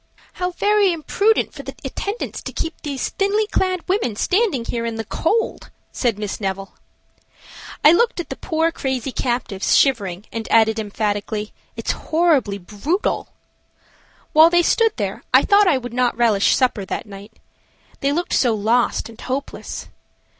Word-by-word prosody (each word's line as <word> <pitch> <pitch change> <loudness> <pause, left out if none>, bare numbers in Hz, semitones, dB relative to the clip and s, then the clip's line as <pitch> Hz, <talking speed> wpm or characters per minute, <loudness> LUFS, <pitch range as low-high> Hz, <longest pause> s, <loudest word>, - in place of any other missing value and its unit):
"How 360 0 -2
very 410 +1 +3
imprudent 400 +7 +1
for - - -8
the - - -8
attendants 410 +4 -4
to - - -6
keep 325 - -3
these 280 -4 -3
thinly 410 +2 +1
clad 370 -4 -1
women 370 - 0
standing 365 - +1
here 235 0 -3
in 230 -1 -3
the 225 0 -4
cold," 365 - -1 0.2
said 235 -5 0
Miss 210 0 -4
Neville. 195 0 -3 1.1
I 300 - +10
looked 455 +4 +2
at 345 - -5
the - - -4
poor 325 +1 0
crazy 265 -3 -3
captives 240 -7 -1
shivering, 205 -8 +2
and 225 -1 -5
added, 220 0 +4
emphatically, 210 0 -3 0.2
"It's - - -2
horribly 310 -11 +1
brutal." 210 - -2 1.1
While 315 +2 +8
they 345 0 +4
stood 450 +4 +2
there - - -3
I - - +7
thought 405 -1 +5
I 295 - +4
would 245 -2 -7
not 250 -1 +1
relish 220 -4 +3
supper 250 -6 +1
that 190 - -4
night. 205 +1 -11 0.7
They 275 - +1
looked 345 +4 -2
so 240 -4 +3
lost 225 +4 +1
and 225 -1 -13
hopeless. 270 +2 -5
255 Hz, 155 wpm, -21 LUFS, 220-350 Hz, 1.1 s, I